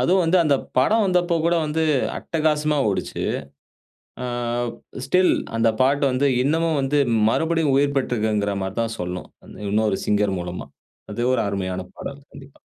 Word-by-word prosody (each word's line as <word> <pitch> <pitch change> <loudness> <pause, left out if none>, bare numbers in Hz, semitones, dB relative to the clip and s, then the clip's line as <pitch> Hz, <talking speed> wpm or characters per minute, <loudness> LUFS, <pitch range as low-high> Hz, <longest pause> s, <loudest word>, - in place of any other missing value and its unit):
அதுவும் 185 +1 +3
வந்து, 170 +3 +3
அந்த 140 -3 +3 0.2
படம் 215 - +3
வந்தப்போ 180 -2 +2
கூட, 170 - +3
வந்து 160 +2 -1 0.4
அட்டகாசமா 155 -2 0
ஓடுச்சு. 100 - -3 1.0
ஆ - - -3 0.8
ஸ்டில் 180 +5 +4 0.2
அந்த 115 0 +3
பாட்டு 140 +2 +3
வந்து, 130 +3 +1 0.2
இன்னமும் 160 +2 +1
வந்து 140 +2 +1 0.3
மறுபடியும் 160 +2 +1
உயிர் 140 +1 +2
பெற்ருக்குங்ற 110 -5 0
மாரி 95 +1 -4
தான் 115 0 -3
சொல்லணும். 90 0 -5 0.2
அந்த - - -13
இன்னொரு 105 -2 +1
சிங்கர் 105 -2 +1
மூலமா. 90 0 -6 0.5
அது 120 - -5
ஒரு 115 - +1
அருமையான 95 -2 -3 0.2
பாடல் 140 0 -7
கண்டிப்பா. 135 0 -14
135 Hz, 145 wpm, -22 LUFS, 105-160 Hz, 1.0 s, ஸ்டில்